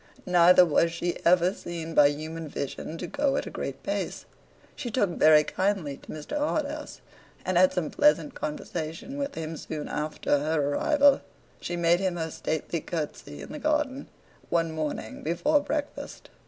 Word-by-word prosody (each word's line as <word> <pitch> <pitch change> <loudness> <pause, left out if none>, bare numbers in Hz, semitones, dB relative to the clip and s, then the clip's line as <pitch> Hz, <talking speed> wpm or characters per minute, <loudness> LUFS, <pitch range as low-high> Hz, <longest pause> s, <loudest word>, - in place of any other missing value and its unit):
Neither 180 0 +7
was 165 +1 +2
she 170 +1 -3
ever 180 +1 +4
seen 165 -4 -6
by 145 -2 +7
human 155 +2 -4
vision 145 +3 -5
to - - -5
go 285 -1 0
at - - -2
a - - -7
great - - -5
pace. - - -3 0.5
She 245 - -5
took 210 -5 +1
very 155 -2 +6
kindly 185 -6 -1
to - - -19
Mr. 155 - -6
Harthouse, 300 0 -2 0.4
and 185 - 0
had 185 +1 +6
some 175 -5 -2
pleasant 295 -1 +3
conversation 160 - -5
with 280 0 -3
him 160 0 -4
soon 155 -1 -6
after 150 -1 -1
her 150 -1 0
arrival. 285 - +4 0.4
She 175 - -4
made 170 0 +3
him 190 -2 0
her 160 -2 -3
stately 160 +2 -2
curtsey 150 - -5
in 70 - -10
the - - -6
garden, 295 -3 0 0.4
one 165 -1 +1
morning 155 -8 -4
before 280 - +2
breakfast. 290 0 -5
170 Hz, 165 wpm, -27 LUFS, 155-260 Hz, 0.5 s, Neither